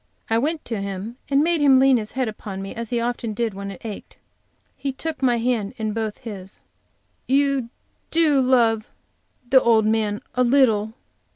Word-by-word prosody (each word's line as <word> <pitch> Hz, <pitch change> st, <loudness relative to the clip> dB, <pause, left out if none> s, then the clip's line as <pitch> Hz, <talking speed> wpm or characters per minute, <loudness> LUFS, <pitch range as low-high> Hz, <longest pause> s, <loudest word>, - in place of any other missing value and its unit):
I 225 Hz, -, +4 dB
went 305 Hz, +5 st, -2 dB
to 225 Hz, -4 st, -3 dB
him 200 Hz, +4 st, -5 dB
and 280 Hz, +1 st, +3 dB
made 335 Hz, -1 st, +1 dB
him 270 Hz, -2 st, +6 dB
lean 265 Hz, -1 st, +5 dB
his 215 Hz, -2 st, -5 dB
head 260 Hz, -1 st, -1 dB
upon 210 Hz, -2 st, -6 dB
me 195 Hz, 0 st, -6 dB
as 230 Hz, -1 st, -6 dB
he 240 Hz, -, 0 dB
often 235 Hz, -2 st, -2 dB
did 230 Hz, -2 st, -1 dB
when 200 Hz, +1 st, -6 dB
it 195 Hz, +3 st, -10 dB
ached. 215 Hz, -2 st, -8 dB, 0.6 s
He 275 Hz, +1 st, -3 dB
took 315 Hz, +3 st, -5 dB
my 245 Hz, -3 st, +3 dB
hand 230 Hz, -4 st, -1 dB
in 215 Hz, -1 st, -2 dB
both 220 Hz, -1 st, -3 dB
his. 200 Hz, -6 st, -9 dB, 0.7 s
"You 275 Hz, -2 st, +1 dB, 0.4 s
do 310 Hz, -4 st, +3 dB
love 230 Hz, -4 st, +3 dB, 0.6 s
the 260 Hz, +1 st, +6 dB
old 225 Hz, -2 st, +4 dB
man 215 Hz, +1 st, 0 dB
a 250 Hz, -, +2 dB
little?" 230 Hz, -4 st, +3 dB
235 Hz, 180 wpm, -22 LUFS, 215-265 Hz, 0.7 s, him